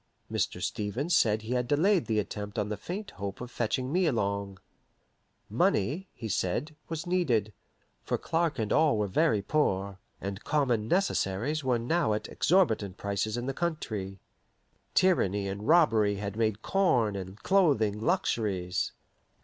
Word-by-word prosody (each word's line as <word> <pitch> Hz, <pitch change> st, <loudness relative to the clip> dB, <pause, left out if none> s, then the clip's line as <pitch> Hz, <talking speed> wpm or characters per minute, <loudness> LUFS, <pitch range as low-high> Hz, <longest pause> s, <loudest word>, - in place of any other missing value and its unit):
Mr. -, -, -1 dB
Stevens 125 Hz, -, -1 dB
said 110 Hz, -4 st, +3 dB
he 115 Hz, +3 st, -3 dB
had 125 Hz, -1 st, 0 dB
delayed 170 Hz, +7 st, +3 dB
the 110 Hz, -2 st, 0 dB
attempt 105 Hz, 0 st, -4 dB
on 105 Hz, -1 st, -1 dB
the 105 Hz, -, -2 dB
faint 180 Hz, -, -6 dB
hope 100 Hz, 0 st, -6 dB
of 125 Hz, 0 st, -7 dB
fetching 125 Hz, +3 st, -1 dB
me 180 Hz, -1 st, +3 dB
along. 100 Hz, -6 st, -1 dB, 0.9 s
Money, 150 Hz, -, +1 dB
he 115 Hz, -, -6 dB
said, 110 Hz, -, -1 dB
was 165 Hz, +1 st, -4 dB
needed, 130 Hz, -, +1 dB, 0.5 s
for -, -, -1 dB
Clark 165 Hz, -1 st, 0 dB
and 110 Hz, -3 st, -1 dB
all 155 Hz, -7 st, +4 dB
were 105 Hz, -, +1 dB
very 105 Hz, -, +2 dB
poor, 100 Hz, -8 st, 0 dB, 0.2 s
and 100 Hz, +1 st, -5 dB
common 125 Hz, -8 st, +1 dB
necessaries 150 Hz, -, 0 dB
were 125 Hz, -2 st, +2 dB
now 120 Hz, +1 st, +1 dB
at 105 Hz, -, -3 dB
exorbitant 110 Hz, -, +2 dB
prices 100 Hz, +2 st, -2 dB
in 120 Hz, -, -3 dB
the 135 Hz, -, -2 dB
country. 110 Hz, -, -3 dB, 0.8 s
Tyranny 105 Hz, -, +3 dB
and 100 Hz, +3 st, -5 dB
robbery 115 Hz, -11 st, +4 dB
had 100 Hz, 0 st, -4 dB
made 110 Hz, -1 st, 0 dB
corn 125 Hz, -, +2 dB
and 95 Hz, 0 st, -6 dB
clothing 140 Hz, -, +3 dB
luxuries. 95 Hz, -7 st, 0 dB
110 Hz, 150 wpm, -29 LUFS, 100-155 Hz, 0.9 s, all